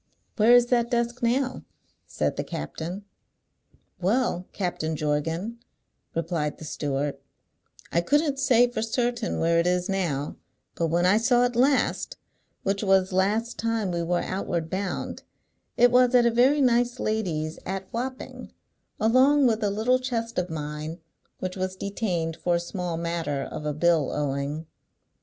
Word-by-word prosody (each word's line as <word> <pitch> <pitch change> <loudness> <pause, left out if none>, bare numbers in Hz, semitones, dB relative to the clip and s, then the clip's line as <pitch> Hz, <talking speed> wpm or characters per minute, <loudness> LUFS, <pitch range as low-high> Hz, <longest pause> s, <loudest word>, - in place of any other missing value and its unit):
"Where 230 +3 +6
is 245 -1 +6
that 235 -1 +3
desk 240 0 -1
now?" 255 +3 0 0.5
said - - -1
the - - -2
captain. 180 +5 -6 0.9
"Well, 190 -1 0
Captain 165 -4 -2
Jorgan," 160 +9 -2 0.6
replied 165 -2 -1
the 155 - -9
steward, 145 -2 -2 0.7
"I 170 - +2
couldn't 285 - +1
say 245 -3 +5
for 240 - -2
certain 235 0 -1
where 165 +1 +3
it 170 - +2
is 180 +1 0
now; 165 -8 -1 0.4
but 165 - 0
when 170 +2 +1
I 190 +3 +5
saw 245 +2 +3
it 245 -1 -2
last, 275 - +2 0.5
which 195 0 0
was 190 -2 +3
last 210 +6 0
time 225 -4 0
we 170 -1 -1
were 175 +1 0
outward 170 -4 -3
bound, 190 -1 -3 0.6
it 245 0 +6
was 250 0 +5
at 240 -1 +6
a 235 - +4
very 260 +5 +4
nice 245 0 +2
lady's 165 -8 -2
at 190 +1 -4
Wapping, 255 +2 -5 0.5
along 260 +6 +5
with 225 -2 +2
a 205 - +2
little 225 +5 +2
chest 235 -4 -2
of 180 0 -2
mine 155 +1 -5 0.4
which 185 0 -4
was 185 0 -3
detained 180 -5 -2
for 175 -1 +1
a - - +1
small 175 -1 -4
matter 165 -4 -2
of 150 - -6
a 150 - 0
bill 165 -3 +2
owing." 145 +2 -2
195 Hz, 150 wpm, -26 LUFS, 165-240 Hz, 0.9 s, Where